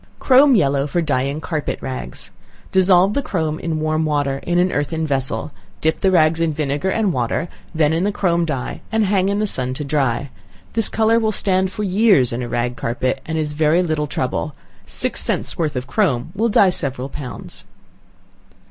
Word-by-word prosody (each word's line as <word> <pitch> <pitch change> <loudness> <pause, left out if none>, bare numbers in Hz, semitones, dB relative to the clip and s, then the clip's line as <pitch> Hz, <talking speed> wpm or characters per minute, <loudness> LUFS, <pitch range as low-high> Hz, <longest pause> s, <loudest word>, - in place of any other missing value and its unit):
Chrome 270 +1 +5
Yellow 140 -6 +2
for 175 - -1
Dyeing 145 -2 -1
Carpet 155 -4 -3
Rags. 130 -1 -5 0.4
Dissolve 190 +1 +5
the 280 - 0
chrome 160 - -2
in 160 -2 -2
warm 155 0 0
water 145 -3 0
in 175 0 -1
an 180 +1 +3
earthen 160 +2 -1
vessel; 135 -6 -2 0.3
dip 160 0 0
the 190 - +3
rags 165 -3 +3
in 165 -2 +1
vinegar 145 +3 -1
and 205 -2 +1
water, 125 +7 -1 0.3
then 155 -1 +3
in 165 +2 0
the 205 - +1
chrome 175 -4 +1
dye, 145 -6 -3
and 220 -1 +2
hang 195 -1 +2
in 200 - 0
the 215 - +1
sun 130 -9 -1
to 150 - -4
dry. 140 -2 -1 0.4
This 225 -2 +1
color 225 +1 +3
will 220 -1 +1
stand 190 -2 +1
for 210 - -4
years 190 - +3
in 120 - -3
a 120 - -4
rag 120 +1 -1
carpet, 130 +3 -2
and 160 0 -2
is 150 -1 -1
very 155 +4 +3
little 155 -3 -1
trouble. 140 +2 -2 0.3
Six - - -1
cents - - -1
worth 155 -4 -1
of 125 0 -3
chrome 140 - 0
will 225 +4 +1
dye 200 -3 +5
several 135 -6 -2
pounds. 140 -2 -7
155 Hz, 190 wpm, -20 LUFS, 140-190 Hz, 0.4 s, Chrome